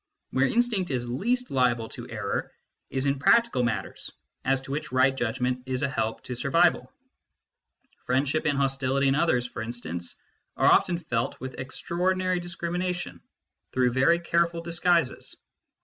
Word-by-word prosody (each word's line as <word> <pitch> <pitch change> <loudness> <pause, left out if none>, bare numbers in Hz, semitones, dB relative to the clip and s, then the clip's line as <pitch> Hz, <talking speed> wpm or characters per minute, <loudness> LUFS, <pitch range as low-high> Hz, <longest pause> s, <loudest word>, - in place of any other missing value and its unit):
Where 130 +1 +3
instinct 225 - +1
is 125 -3 -2
least 240 - -1
liable 120 -3 +2
to - - -8
error - - -3 0.4
is 135 0 -1
in 140 -1 +1
practical 235 - +4
matters 120 -2 -3 0.3
as 135 0 +2
to 135 - -9
which 145 -1 -3
right 130 +1 +3
judgment 125 +1 -1
is 130 -1 -1
a - - +3
help 110 -4 -2
to 125 - -5
survival: - - +2 1.2
friendship 140 +5 +1
and 145 -2 +1
hostility 135 0 +1
in - - +3
others, 135 -5 +2
for 125 - -6
instance, 100 -8 -5 0.4
are - - +5
often 175 -2 +4
felt 120 -9 -2
with 130 +1 -7
extraordinary 185 +6 -1
discrimination 175 +1 -3 0.5
through 125 -1 +3
very 135 +7 +4
careful 170 0 +1
disguises. 170 -3 +1
135 Hz, 145 wpm, -27 LUFS, 125-170 Hz, 1.2 s, are